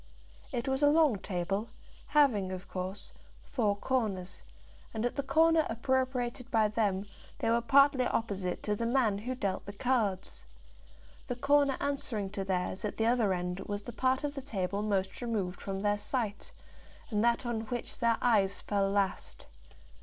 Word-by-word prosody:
It 240 -2 -2
was 265 +1 0
a 290 - +6
long 295 -8 +4
table, 195 +4 -2 0.4
having, 235 -11 +3
of 185 0 -6
course, 185 +2 -5 0.3
four 215 -6 0
corners, 205 -6 -2 0.5
and 220 +1 -1
at 245 - -1
the - - 0
corner 320 +3 +4
appropriated 255 0 -1
by 220 -3 +3
them 205 -2 0 0.3
they 225 - 0
were 235 +1 +3
partly 275 +1 +5
opposite 195 -5 -2
to 210 - 0
the 230 +2 -2
man 230 -5 +2
who 250 +5 -3
dealt 200 -6 -2
the 200 - -6
cards. 205 - -1 0.8
The 245 - -2
corner 280 +1 +3
answering 230 -8 -2
to 200 -1 -3
theirs 185 0 -2
at 210 - -3
the 225 - +1
other 230 -4 +3
end 180 0 -2
was 205 0 -3
the 240 - -7
part 260 +3 +1
of 290 -1 -2
the 275 - -5
table 200 -6 -2
most 200 -1 -1
removed 210 -7 -2
from 195 -1 -4
their 205 0 +1
sight, 220 - -3 0.6
and 210 0 +1
that 235 +2 +2
on 235 -2 -1
which 240 0 -5
their 230 -1 +3
eyes 200 -5 +3
fell 200 -1 +1
last. 195 -1 -1
225 Hz, 170 wpm, -31 LUFS, 195-255 Hz, 0.8 s, a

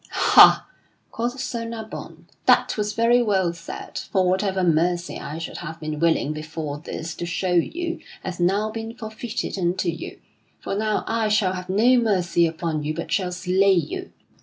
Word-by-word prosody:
"Ha!" - - +6 0.4
quoth 240 +3 -3
Sir 250 -2 -3
Nabon, 230 -1 -8 0.2
"that - - +4
was 210 -1 -2
very 235 +2 +4
well 190 -6 +1
said, 170 0 -7
for 190 -2 0
whatever 190 0 +1
mercy 175 +1 +1
I 150 - -6
should 165 - -6
have 165 -1 -7
been 155 -1 -4
willing 160 -2 +2
before 155 -1 -5
this 160 +1 -6
to 175 - -5
show 180 +1 -1
you 335 - 0 0.2
hath 180 -2 -5
now 200 +5 +1
been 225 +1 -6
forfeited 220 -1 -5
unto 175 0 0
you. 165 -1 -6 0.4
For - - -4
now 215 +1 0
I 225 -1 0
shall 210 -3 +2
have 185 0 -6
no 230 +7 +4
mercy 185 -7 +2
upon 160 -1 -3
you 155 +1 -2
but 165 - -5
shall 185 -2 0
slay 190 +2 +3
you." 370 - -2
185 Hz, 170 wpm, -23 LUFS, 170-220 Hz, 0.4 s, Ha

